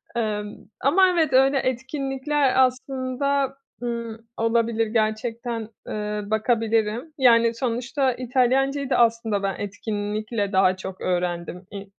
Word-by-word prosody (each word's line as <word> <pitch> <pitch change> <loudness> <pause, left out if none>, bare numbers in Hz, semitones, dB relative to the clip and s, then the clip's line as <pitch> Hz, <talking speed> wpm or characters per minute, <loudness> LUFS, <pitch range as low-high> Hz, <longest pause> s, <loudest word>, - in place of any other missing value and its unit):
Emm, 210 -3 -2 0.3
ama 370 +7 +5
evet 325 -6 +1
öyle 270 +2 +5
etkinlikler 265 +1 +1
aslında, 265 +1 -1 0.3
ımm, 235 -2 -3 0.2
olabilir, 230 0 +1
gerçekten, 225 +1 -2 0.2
ııı, 210 -1 -4
bakabilirim. 225 +4 0
Yani, 235 -3 +5
sonuçta 255 +3 -1
İtalyancayı 260 +3 +1
da - - +2
aslında 230 -3 +2
ben 195 - -1
etkinlikle 205 +1 -3
daha 190 -1 +4
çok 190 0 -8
öğrendim. 180 0 -2
İ 200 0 -6
235 Hz, 110 wpm, -24 LUFS, 215-265 Hz, 0.3 s, ama